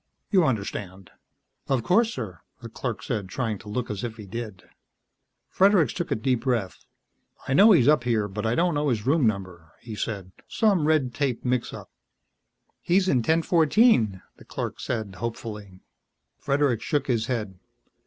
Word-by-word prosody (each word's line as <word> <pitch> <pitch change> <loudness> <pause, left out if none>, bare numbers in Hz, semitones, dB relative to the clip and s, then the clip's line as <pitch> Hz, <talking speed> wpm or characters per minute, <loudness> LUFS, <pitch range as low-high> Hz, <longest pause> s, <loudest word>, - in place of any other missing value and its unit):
"You 185 -5 +4
understand." 100 -6 -4 0.6
"Of 130 -4 0
course, 225 - +3
sir," 100 - -6 0.2
the - - -9
clerk - - -5
said, 100 -4 -3
trying 110 -3 -3
to 105 - -12
look 115 +2 -3
as 105 +1 -5
if 115 -2 -5
he 105 - -9
did. 105 -2 -7 0.8
Fredericks 190 - +3
took - - -4
a - - +1
deep 125 +2 0
breath. 120 -8 -2 0.6
"I 130 - 0
know 200 +10 +7
he's 155 - +5 0.2
here, 115 -4 0
but 105 +1 -5
I 115 +1 0
don't 175 +1 +2
know 145 0 0
his 110 -4 -1
room 140 -2 +3
number," 90 -6 -4
he 115 - -9
said. 100 -3 -4 0.2
"Some 195 -9 +2
red 145 -6 +2
tape 130 -2 -2
mixup." 125 -1 -2 0.9
"He's 185 +2 +2
in 140 - +3
1014," 160 - +3
the - - -16
clerk - - -5
said 110 -5 -3
hopefully. 105 -3 -6 0.6
Fredericks 140 -5 0
shook 145 +5 0
his 115 -3 0
head. 105 -7 -3
120 Hz, 160 wpm, -25 LUFS, 105-145 Hz, 0.9 s, know